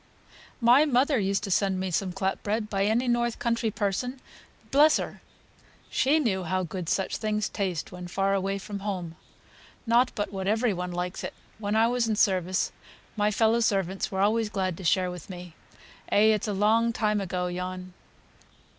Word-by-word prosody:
"My 245 +4 +6
mother 275 -1 +2
used 195 0 0
to 200 - -3
send 190 0 +1
me 185 0 -2
some 185 +2 0
clap 190 +1 -2
bread 210 +1 -2
by 195 -1 +1
any 235 +4 +1
north 240 -1 +1
country 230 -1 0
person 215 +6 -2 0.5
bless 300 +3 +6
her! - - -6 0.7
She 280 +4 +3
knew 220 -11 0
how 185 +2 -1
good 180 0 -5
such 190 - 0
things 215 -1 -1
taste 185 -6 -3
when 180 0 -8
far 195 +2 0
away 195 0 0
from 200 +1 -6
home. 185 -5 -4 0.7
Not 240 +2 +3
but 205 -1 -3
what 190 -1 -3
every 220 +1 +2
one 180 0 -4
likes 180 +1 -4
it. - - -5 0.2
When 205 0 -1
I 220 +1 +5
was 245 -1 +1
in 220 - +1
service 185 -3 +1 0.4
my 210 -1 +2
fellow 220 +2 +2
servants 195 -4 0
were 190 -1 -1
always 215 +2 +2
glad 190 -4 -1
to 190 - -9
share 180 +3 +2
with 180 -1 -9
me. 180 -2 -9 0.6
Eh, 220 +1 +5
it's 210 0 -2
a - - -1
long 220 +4 +3
time 210 -2 0
ago, 180 -1 -2
yon." 180 +1 -5
200 Hz, 180 wpm, -27 LUFS, 185-225 Hz, 0.7 s, My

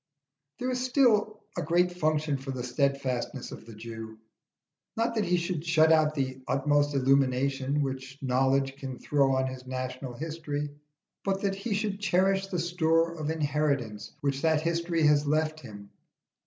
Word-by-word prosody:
There 255 +1 -2
is 250 0 -1
still 225 -5 +2
a - - -1
great 175 +3 +2
function 155 -3 0
for 135 +1 -9
the 130 -2 -3
steadfastness 135 -1 -1
of - - -10
the 115 - -10
Jew: 110 0 -8 0.8
not 230 +1 +1
that 215 -3 0
he 180 +1 +2
should 170 -2 -2
shut 160 -1 +4
out 155 -1 +4
the 130 -2 -2
utmost 145 +2 +2
illumination 135 +1 +2
which 135 0 -5
knowledge 135 +1 +1
can 130 -2 -6
throw 140 -2 +2
on 130 0 +1
his 130 -1 -6
national 130 0 -4
history, 150 0 -4 0.5
but 195 0 0
that 200 -1 +1
he 200 +2 -2
should 205 -1 -2
cherish 195 0 +2
the 185 - -3
store 165 -1 +2
of 155 -2 -4
inheritance 145 -8 -1
which 140 -1 -1
that 160 -1 +3
history 170 0 0
has 150 0 +4
left 155 +1 +1
him. 100 -6 -11
150 Hz, 160 wpm, -28 LUFS, 135-170 Hz, 0.8 s, shut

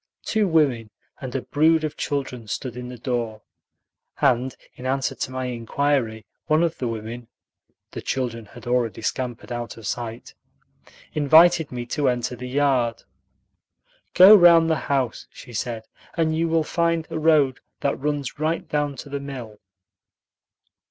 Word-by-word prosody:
Two 215 -2 +1
women 140 -10 +2 0.3
and 130 -2 -7
a 135 - -2
brood 160 +2 +3
of 155 - -3
children 130 -5 -3
stood 120 +3 -4
in 125 0 -7
the 125 - -8
door, 115 -3 -3 0.8
and 125 +1 +2 0.2
in 130 - -7
answer 135 0 0
to - - -4
my 130 0 -4
inquiry 120 -1 -1 0.2
one 155 +2 +3
of 165 -2 -1
the 125 - -1
women 115 +1 -6 0.6
(the - - -6
children 115 -4 -3
had - - -13
already 120 -4 -1
scampered 125 +1 -3
out 120 -1 -5
of 115 - -11
sight) 115 +1 -5 0.8
invited 160 +2 +5
me 120 -1 -4
to 140 +2 0
enter 125 0 -2
the 125 +1 -7
yard. 130 -4 +1 1.1
"Go 190 +4 +10
round 170 -3 +6
the 160 - +2
house," 130 -5 -1
she 125 - -13
said, 115 0 -4 0.3
"and 160 -1 +1
you 165 +1 +1
will 165 -1 +2
find 165 0 0
a - - -2
road 150 -5 +3 0.2
that 140 - 0
runs 145 -2 -3
right 160 +2 -1
down 145 -1 -1
to 135 - -9
the 140 0 -4
mill." 125 -7 -8
130 Hz, 155 wpm, -23 LUFS, 120-155 Hz, 1.1 s, Go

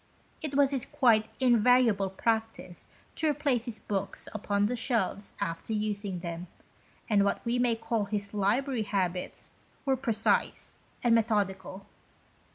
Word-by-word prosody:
It 300 -4 -4
was 280 -1 +4
his 265 -3 0
quite 230 -7 +3
invariable 240 -5 +4
practice 220 -2 -2 0.2
to 320 - 0
replace 280 -5 0
his 235 -3 -6
books 195 -1 -3
upon 205 -1 0
the 245 +4 0
shelves 225 -5 -1
after 165 +6 -3
using 205 -4 -2
them, 170 0 -5 0.6
and 205 -3 +4
what 200 - 0
we 240 +1 +1
may 245 -2 +3
call 225 -2 -1
his 200 0 -3
library 225 +5 +1
habits 185 -3 -2 0.3
were 270 -1 +3
precise 230 -4 0 0.3
and 240 -1 +4
methodical. 200 -4 0
220 Hz, 135 wpm, -29 LUFS, 200-245 Hz, 0.6 s, was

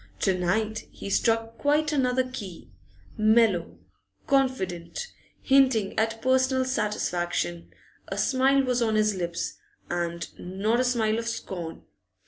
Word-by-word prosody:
To 190 - +2
night 215 +5 -1
he 200 - -7
struck 225 +1 +1
quite 300 +1 +2
another 255 -2 +2
key, 210 -9 -8 0.5
mellow, 215 - +3 0.5
confident, 260 - 0 0.4
hinting 260 -7 +3
at 225 0 -1
personal 260 0 +3
satisfaction; 175 - -2 0.4
a 195 - -5
smile 270 +4 +3
was 250 -1 0
on 220 -2 +1
his 215 0 +3
lips, 170 -2 -4 0.3
and 170 -1 -2
not 200 +6 -1
a - - +3
smile 230 -3 +1
of 230 - -5
scorn. 175 -7 -5
220 Hz, 120 wpm, -26 LUFS, 185-255 Hz, 0.5 s, mellow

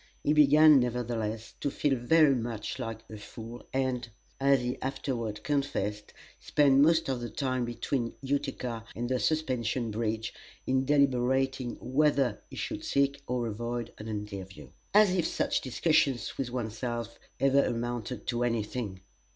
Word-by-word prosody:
He 150 - +3
began 150 0 +7
nevertheless, 115 -2 -2
to 145 - -1
feel 140 0 +1
very 145 +4 +4
much 115 -1 -3
like 115 -3 -5
a 110 - -9
fool, 115 +3 -10
and 130 -2 -1 0.3
as 140 0 +4
he 125 +1 -3
afterward 125 -5 -3
confessed 135 -8 -2 0.3
spent 140 -2 +3
most 165 +2 +4
of 130 -3 -1
the 120 - -4
time 130 -3 -1
between 120 +1 -2
Utica 135 -4 -2
and 120 +2 -2
the 130 0 0
Suspension 125 -7 0
Bridge 110 +1 -2 0.3
in 130 0 +1
deliberating 130 -2 +2
whether 135 -3 +1
he - - -10
should - - -4
seek 140 0 +1
or 125 -1 -1
avoid 120 +1 -4
an 110 - -7
interview. 100 - -6 0.2
As 210 -2 +6
if 180 -3 +1
such - - 0
discussions 135 -3 +1
with 130 -3 -3
one's 115 -3 -4
self 120 -1 -4 0.2
ever 135 0 +4
amounted 120 -1 -3
to 120 0 -1
any 115 -3 +1
thing! 105 -4 -5
125 Hz, 150 wpm, -29 LUFS, 115-135 Hz, 0.3 s, began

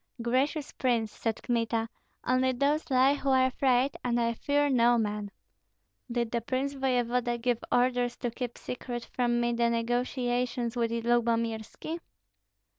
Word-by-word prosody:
"Gracious 265 +6 0
prince," 235 -4 0
said 225 0 -3
Kmita, 230 -2 0 0.4
"only 255 +1 +2
those 290 +5 0
lie 260 +1 +5
who 280 -1 -2
are 260 -1 +5
afraid, 260 0 +2
and 240 -1 +1
I 235 0 +1
fear 290 +5 +1
no 240 -3 +4
man." 210 -2 -2 0.8
"Did 235 -1 -1
the 235 - 0
prince 260 +4 -2
voevoda 250 -2 0
give 240 -1 0
orders 245 -1 +2
to 240 - -3
keep 245 0 -5
secret 245 -1 -5
from 240 -1 +1
me 240 0 +1
the 235 0 +2
negotiations 245 0 -1
with 235 -1 +1
Lyubomirski?" 230 +5 -1
245 Hz, 140 wpm, -29 LUFS, 235-255 Hz, 0.8 s, lie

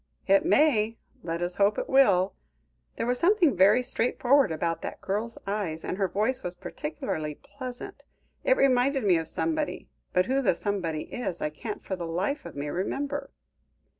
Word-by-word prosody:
"It 195 0 +4
may. 230 -7 +3 0.2
Let 170 -2 -3
us 175 0 -2
hope 205 +1 +3
it - - -2
will. 200 -9 +4 0.6
There - - -2
was 245 +1 0
something 355 - +4
very 200 +7 +5
straightforward 250 -1 +2
about 165 +1 -1
that - - -6
girl's 210 +4 -3
eyes, 195 -6 -3
and 185 - -4
her 195 - +2
voice 215 +7 0
was 180 0 -4
particularly 155 -3 -4
pleasant. 255 - -8 0.4
It - - +3
reminded 265 0 +3
me 185 -4 +4
of 160 -1 -3
somebody, 315 - -2 0.2
but 180 0 +3
who 265 +5 +1
the 200 -9 +2
somebody 170 -7 -2
is 215 -8 -4
I 150 - -2
can't 210 +7 -7
for 190 - -2
the 170 -2 -5
life 195 - -2
of - - -11
me 145 +1 -4
remember." 280 - -3
205 Hz, 170 wpm, -27 LUFS, 175-260 Hz, 0.6 s, very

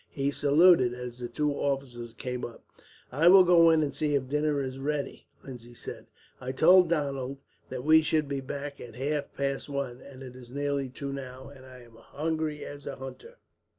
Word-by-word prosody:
He 140 0 -1
saluted 145 -3 +4
as 125 -1 -8
the 120 - -4
two 150 +3 -1
officers 135 -5 -3
came 125 0 -5
up. 120 - -8 0.5
"I 150 +6 +3
will 190 +1 +9
go 170 -2 +6
in 160 -1 +4
and 145 - -2
see 150 -1 0
if 135 -2 -1
dinner 150 0 +1
is 130 -1 -4
ready," 145 +1 -3 0.2
Lindsay 120 -2 -10
said. - - -9 0.3
"I 130 +1 -5
told 180 +5 +6
Donald 140 -4 -2 0.3
that 125 -1 -5
we 160 +2 +6
should 155 -1 0
be 140 -1 -3
back 140 +1 -6
at 115 -2 -10
half 145 +2 -2
past 140 +1 -2
one, 140 -3 -4
and 135 -1 -12
it 125 -1 -10
is 125 -2 -12
nearly 140 -1 -2
two 140 +2 -6
now, 130 -1 -8
and 130 -2 -14
I 130 -1 -13
am 115 -1 -18
as - - -18
hungry 155 0 -2
as 145 0 -9
a 140 - -4
hunter." 405 - -10
140 Hz, 200 wpm, -28 LUFS, 130-150 Hz, 0.5 s, will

